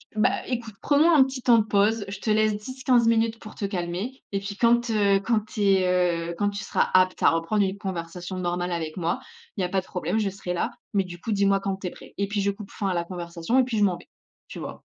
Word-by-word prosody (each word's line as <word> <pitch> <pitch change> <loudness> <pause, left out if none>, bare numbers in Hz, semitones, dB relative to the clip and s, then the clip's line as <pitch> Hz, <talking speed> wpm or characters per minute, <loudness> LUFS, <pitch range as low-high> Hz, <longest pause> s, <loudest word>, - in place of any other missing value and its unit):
bah, 215 +4 +4 0.2
écoute, 235 -4 -4
prenons 295 +3 +4
un 290 -5 +7
petit 260 -1 -5
temps 240 -2 +5
de 220 - +4
pause. 210 +1 +2
Je 195 0 -6
te 220 - -3
laisse 215 0 +3
10-15 250 +1 +1
minutes 230 0 +2
pour 215 - -11
te 200 - -3
calmer 190 +6 -4
et 195 - 0
puis, 200 0 -6
quand, 235 +1 +3
heu, 200 -2 +3
quand 230 +1 +2
tu 210 0 -7
es, 180 -3 +2
heu, 170 - -4
quand 205 +2 +1
tu 205 - -5
seras - - +1
apte 185 0 +3
à - - +7
reprendre 165 +6 +1
une 190 +1 -3
conversation 180 -1 -5
normale 175 0 -2
avec 160 -2 -3
moi, 175 +6 -1 0.4
il - - -1
y - - +1
a 180 - -1
pas 190 +1 +1
de - - -20
problème, 180 +4 -1
je 205 -2 0
serai 185 -2 -5
là, 175 - -1 0.2
mais 195 - +3
du 175 -1 -9
coup 225 - -4
dis-moi 200 -1 +3
quand 195 -1 -2
tu 190 - -5
es - - -2
prêt» - - -14
et 200 - +1
puis, 205 0 -1
je 200 - +1
coupe 200 0 -10
fin 200 - -3
à 185 - 0
la 170 - 0
conversation 170 +5 -3
et - - +5
puis 245 -3 -2
je - - +4
m'en 180 -3 +1
vais, - - -17 0.4
tu - - -8
vois? - - -7
200 Hz, 270 wpm, -25 LUFS, 180-220 Hz, 0.4 s, un